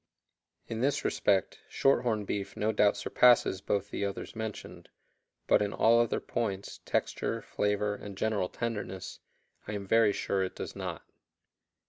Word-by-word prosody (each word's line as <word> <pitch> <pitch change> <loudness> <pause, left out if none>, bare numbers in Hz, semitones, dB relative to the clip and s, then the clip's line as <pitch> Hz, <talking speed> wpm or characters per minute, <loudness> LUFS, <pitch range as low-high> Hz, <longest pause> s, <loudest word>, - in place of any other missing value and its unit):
In 115 0 -4
this 140 +2 +1
respect, 95 -3 +1
shorthorn 120 -6 +2
beef 100 0 -4
no 110 +1 +1
doubt 105 -2 +3
surpasses 120 -6 +4
both 100 +1 -1
the - - -2
others 100 +2 -4
mentioned, 110 -1 -6 0.6
but - - +4
in 105 -1 -1
all 115 +1 +5
other 120 -1 +1
points, 100 -4 -3
texture, - - -1
flavor, 105 0 0
and 100 -1 -8
general 105 -4 0
tenderness, 105 -6 -5 0.5
I 105 - -4
am 100 -1 -4
very 115 +1 +4
sure 100 -1 -1
it 95 - -4
does - - -6
not. - - -5
105 Hz, 145 wpm, -30 LUFS, 100-115 Hz, 0.6 s, all